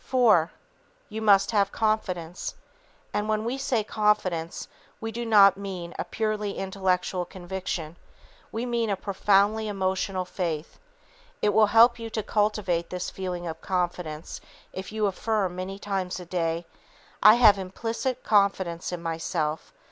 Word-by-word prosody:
IV. 220 -11 +5 0.6
You 220 0 -5
must 200 -2 +5
have 200 -2 +2
confidence. 185 -6 -2 0.6
And 210 +1 -1
when 215 0 0
we 255 +3 -2
say 245 -5 0
confidence 205 -6 0 0.3
we 225 0 -4
do 235 +1 -4
not 200 -3 +7
mean 185 -4 -6
a - - 0
purely 210 +1 -2
intellectual 190 -1 -1
conviction. 175 -3 -5 0.5
We 230 +2 -3
mean 235 -2 0
a 200 - +1
profoundly 205 +2 +2
emotional 190 -1 -1
faith. 170 -4 -4 0.6
It 210 - +4
will 220 -1 +5
help 235 +3 +6
you 230 0 -5
to 220 -1 -3
cultivate 205 -6 0
this 180 0 -4
feeling 180 -2 -4
of 165 -1 -6
confidence 175 -4 -3 0.3
if 190 0 -6
you 215 0 -2
will 205 - +4
affirm 195 -2 -1
many 185 +2 -5
times 195 -3 -3
a 180 - -8
day, 170 -1 -2 0.6
"I 215 +1 +9
have 215 -5 +6
implicit 230 +7 -3
confidence 195 -5 +1
in 175 -1 -5
myself! 165 -1 -2
195 Hz, 145 wpm, -26 LUFS, 180-215 Hz, 0.6 s, I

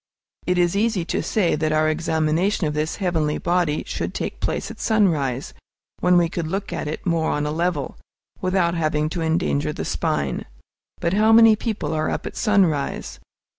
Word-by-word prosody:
It 180 0 +2
is 175 +1 +2
easy 205 -4 +1
to - - -1
say 195 -6 +1
that 155 0 0
our 155 0 +2
examination 160 +4 0
of 150 - -1
this 155 +1 -1
heavenly 165 -6 0
body 175 -4 0
should - - -4
take - - -4
place - - -2
at - - -12
sunrise, 155 - +1 0.5
when 180 0 +4
we 170 -1 +4
could 165 -1 -4
look 195 +3 -3
at - - -3
it 155 - -5
more 165 -3 +1
on 145 0 -1
a 150 - -1
level, 165 -3 -2 0.4
without 185 -2 +1
having 155 -2 0
to 170 - -4
endanger 75 - 0
the - - -5
spine. - - -1 0.5
But 170 - 0
how 215 +2 +4
many 225 -1 +7
people 210 -9 -3
are 155 0 0
up - - -3
at - - -6
sunrise? 185 -10 0
170 Hz, 180 wpm, -22 LUFS, 155-185 Hz, 0.5 s, many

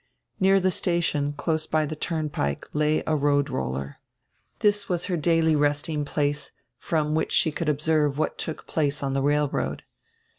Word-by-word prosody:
Near 195 +1 +5
die 185 0 +2
station, 170 -6 0
close 155 +2 -1
by 155 -1 +1
die 155 - -4
turnpike, 150 - -2
lay 150 +1 +1
a 155 - +1
road 145 -1 +2
roller. 70 - -3 0.6
This 205 -1 +2
was 175 -1 0
her 185 - -1
daily 165 -1 +2
resting 145 +1 0
place, 145 0 -1 0.3
from 155 -2 0
which 160 - 0
she 160 - +3
could 160 +1 -2
observe 150 -1 +1
what 155 - -1
took 160 - -4
place 145 -2 -1
on 135 -1 -1
die 135 - +1
railroad. 145 +1 0
150 Hz, 160 wpm, -25 LUFS, 145-160 Hz, 0.6 s, Near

